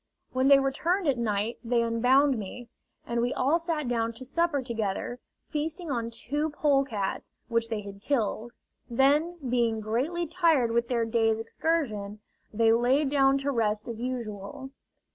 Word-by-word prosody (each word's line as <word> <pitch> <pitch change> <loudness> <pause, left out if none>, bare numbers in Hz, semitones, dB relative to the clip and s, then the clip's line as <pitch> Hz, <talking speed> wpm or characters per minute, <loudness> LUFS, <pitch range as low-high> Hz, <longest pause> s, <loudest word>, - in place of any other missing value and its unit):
When 260 +1 +2
they 280 0 +8
returned 320 +7 0
at 265 -4 +2
night 215 0 -1
they 235 0 +1
unbound 255 +5 +3
me, 230 +4 -8 0.4
and 235 0 -1
we 245 +2 0
all 290 +6 +2
sat 325 -4 -2
down 230 -1 0
to 260 +3 -10
supper 290 0 0
together, 230 0 -3 0.3
feasting 320 +2 -3
on 230 -3 -1
two 290 +7 -2
polecats 275 -9 0 0.2
which 230 -1 +1
they 220 -2 -3
had 200 -1 -10
killed. 235 -2 -1 0.4
Then, 290 +8 +2
being 235 -2 +1
greatly 260 +12 -1
tired 320 -8 +2
with 235 0 +1
their 235 -2 0
day's 225 -1 +2
excursion, 225 -6 -2 0.3
they 225 +1 +4
lay 250 +6 +3
down 275 -1 +3
to 285 - +2
rest 215 -3 0
as 230 -1 -6
usual. 240 0 -5
245 Hz, 155 wpm, -28 LUFS, 225-285 Hz, 0.4 s, they